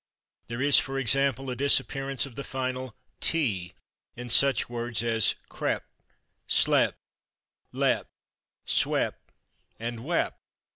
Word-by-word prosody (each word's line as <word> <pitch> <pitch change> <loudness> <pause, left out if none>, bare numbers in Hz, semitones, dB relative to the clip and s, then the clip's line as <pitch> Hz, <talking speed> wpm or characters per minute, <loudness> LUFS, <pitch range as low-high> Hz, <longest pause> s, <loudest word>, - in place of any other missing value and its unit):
There 120 +3 -3
is, 145 0 +6
for 135 0 -3
example, 135 +1 +2
the 130 -1 -3
disappearance 135 0 +1
of 135 - -11
the 140 - -6
final 130 -3 -4 0.3
/t/ 105 - +1 0.4
in 120 0 -5
such 135 0 +4
words 120 -1 -3
as 115 -3 +2 0.2
/crep/, - - -1 0.7
/slep/, - - +3 0.8
/lep/, - - +1 0.6
/swep/ - - +1 0.7
and 115 +1 -4
/wep 165 +9 0
130 Hz, 110 wpm, -27 LUFS, 115-135 Hz, 0.8 s, is